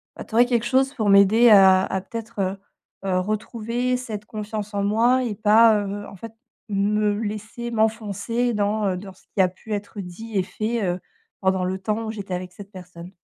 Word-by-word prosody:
bah, - - -7
tu - - -17
aurais 240 +2 +6
quelque 240 -2 0
chose 265 +2 +2
pour 215 -5 0
m'aider 205 +4 +6
à 190 -2 +7
à, 190 -1 -2
peut-être, 225 0 -8
heu 190 +1 -1 0.5
heu, 185 -1 +1
retrouver 230 +5 -2
cette 215 -4 -6
confiance 210 -1 -6
en 200 - -1
moi 235 +5 +3
et 225 -4 -3
pas, 220 +2 +5
heu, 205 +1 -5
en - - -11
fait, 225 +4 -10 0.4
me 205 +1 +1
laisser 220 +2 -5
m'enfoncer 225 +1 -1
dans, 210 +1 0
heu, 185 - -1
dans 190 +1 -9
ce 185 - -25
qui 195 - +4
a - - +4
pu 210 +4 -8
être 205 +1 -5
dit 210 +5 -9
et 185 - +1
fait, 220 +4 -3
heu, 180 -1 -1 0.4
pendant 190 -1 +1
le 185 +1 -2
temps 215 +4 -2
où 220 - -3
j'étais 200 -4 -6
avec 180 0 -4
cette 200 +1 -12
personne. 180 -2 -11
210 Hz, 205 wpm, -23 LUFS, 195-225 Hz, 0.5 s, à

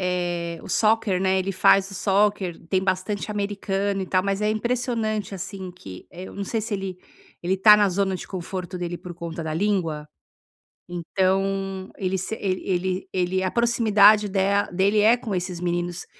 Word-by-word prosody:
eh, 170 -1 -3
o - - -11
soccer, 215 -4 +2
né. 190 0 +2
Ele 190 +1 -2
faz 195 +1 +4
o - - -8
soccer, 195 -2 +1
tem 190 +1 +1
bastante 190 +2 -1
americano 200 -1 -2
e - - -3
tal, 185 0 +1
mas 200 +1 -1
é 210 - +2
impressionante, 220 -3 -1
assim, 185 0 -6
que, 95 - -11
eh, 180 +1 -9
eu - - -10
não 200 - -3
sei 225 +3 -2
se 220 0 -4
ele 190 -2 -4 0.5
ele 180 +2 +1
está 210 +2 +7
na 205 -1 +4
zona 190 0 0
de 180 - -8
conforto 185 -1 -5
dele 175 0 -3
por 175 0 -9
conta 170 -1 -6
da 155 -1 -3
língua. 165 -5 -1 0.8
Então, 190 +2 -1
ele 190 0 -1
se 190 +4 -3
ele 185 -3 -2
ele 185 0 -1
ele 185 0 0
a 185 - -1
proximidade 215 -3 +5
dela 200 +1 +1
dele 195 +4 +2
é 220 +3 +6
com 230 -4 -5
esses 180 -1 -3
meninos, 175 0 -2
190 Hz, 180 wpm, -24 LUFS, 180-205 Hz, 0.8 s, está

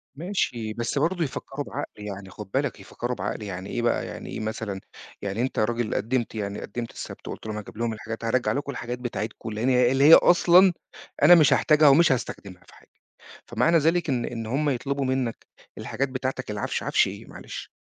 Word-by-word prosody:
ماشي، 135 - -2
بس 120 +5 -3
برضه 170 +4 +1
يفكّروا 135 +1 -5
بعقل، - - -5 0.2
يعني 100 -2 -7
خد 100 +1 -10
بالك 135 -1 -1
يفكّروا 125 +1 -5
بعقل 115 - -4
يعني 95 -1 -6
إيه 120 - -2
بقى، 120 - +1
يعني - - -8
إيه - - -5
مثلًا، 110 -2 -4 0.4
يعني 100 +3 -2
أنت 130 - -1
راجل 115 +1 0
قدِّمت 120 0 -1
يعني 100 -1 -4
قدِّمت 115 +3 -5
السبت - - -9
وقُلت - - -7
لهم 105 - -4
هاجيب 105 0 -9
لهم 115 -1 -1
الحاجات 110 +1 -6
هارجّع 115 -1 +1
لكم 140 +4 -2
الحاجات 120 -2 -5
بتاعتكم 115 -2 -5
لأن 110 +4 -1
هي 125 -1 +4
اللي 135 +1 +2
هي 155 - +9
أصلًا 175 +2 +7 0.5
أنا 175 - +9
مش 155 -4 +6
هاحتاجها 155 -1 +5
ومش 155 +2 +6
هاستخدمها 95 -7 -4
في - - -18
حاجه، - - -22 0.6
فمعنى 125 +9 +3
ذلك 165 +2 +1
إن 125 -4 0
إن 115 -2 -5
هم 145 +6 0
يطلبوا 140 +2 -2
منك 130 -3 -2 0.3
الحاجات 135 +5 -2
بتاعتك 130 -1 -4
العفش، 105 -1 -2
عفش - - +3
إيه - - -9
معلش؟ - - -9
120 Hz, 190 wpm, -25 LUFS, 110-140 Hz, 0.6 s, هي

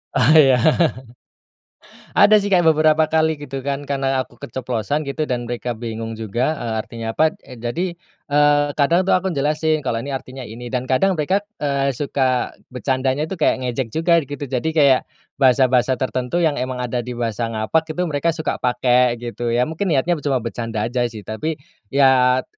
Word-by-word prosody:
Ah, 130 +2 +4
iya. 135 -4 +6 1.6
Ada 210 +1 +6
sih 205 - -2
kayak 180 -3 +3
beberapa 155 0 +3
kali 160 0 +1
gitu 135 -2 -6
kan 140 +1 -3
karena 135 -2 -1
aku 120 - -23
keceplosan 125 +4 -3
gitu 145 +2 -3
dan 120 -1 -2
mereka 120 0 -4
bingung 115 0 -5
juga, 120 +8 -1
eee, 115 -4 -4
artinya 115 0 -7
apa 155 +4 +1
e 130 - -11
jadi, 170 +10 -2 0.4
eee, 145 0 +4
kadang 165 +6 +2
tuh - - +2
aku 185 +1 +1
jelasin 155 +1 0
kalau 115 -3 -1
ini 140 - -6
artinya 130 0 -9
ini 120 +2 -9
dan 130 0 -2
kadang 190 +9 +3
mereka, 170 +4 +1 0.2
eee, 140 -1 0
suka 130 -1 -1 0.2
bercandanya 130 +3 -1
itu 190 - -5
kayak 155 - +2
ngejek 125 0 -2
juga 170 +1 +3
gitu 145 +1 -6
jadi 130 +5 -1
kayak, 140 -5 +4 0.4
bahasa-bahasa 130 -1 +3
tertentu 130 +3 -2
yang 150 -3 +1
emang 130 0 -3
ada 125 0 -2
di 125 - -5
bahasa 115 -1 -2
ngapak 110 +9 0
itu 180 - 0
mereka 155 -1 -1
suka 160 -1 -3
pakai 125 0 +2
gitu 120 0 -5
ya 120 +1 +2
mungkin 160 +7 -3
niatnya 165 +2 +1
ber - - -8
cuma 135 -2 +1
bercanda 115 -2 -3
aja 125 +2 -2
sih 110 -4 -10
tapi 150 - -3 0.3
ya 130 -1 +4
130 Hz, 180 wpm, -20 LUFS, 120-155 Hz, 1.6 s, iya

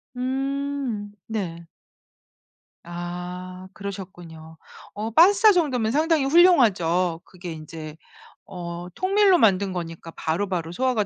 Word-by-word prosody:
음. 270 -4 -3 0.2
네. 175 -7 -4 1.2
아 180 +2 -7
그러셨군요. 175 -5 -9 0.4
어 215 +2 -4
파스타 395 - +6
정도면 255 -10 +1
상당히 310 +1 +2
훌륭하죠. 200 - +4
그게 180 -2 -8
인제 155 0 -9 0.5
어 175 -2 -7
통밀로 385 - +3
만든 200 - +3
거니까 165 -1 -6
바로바로 165 +1 -2
소화가 245 +1 0
195 Hz, 230 characters per minute, -24 LUFS, 175-270 Hz, 1.2 s, 파스타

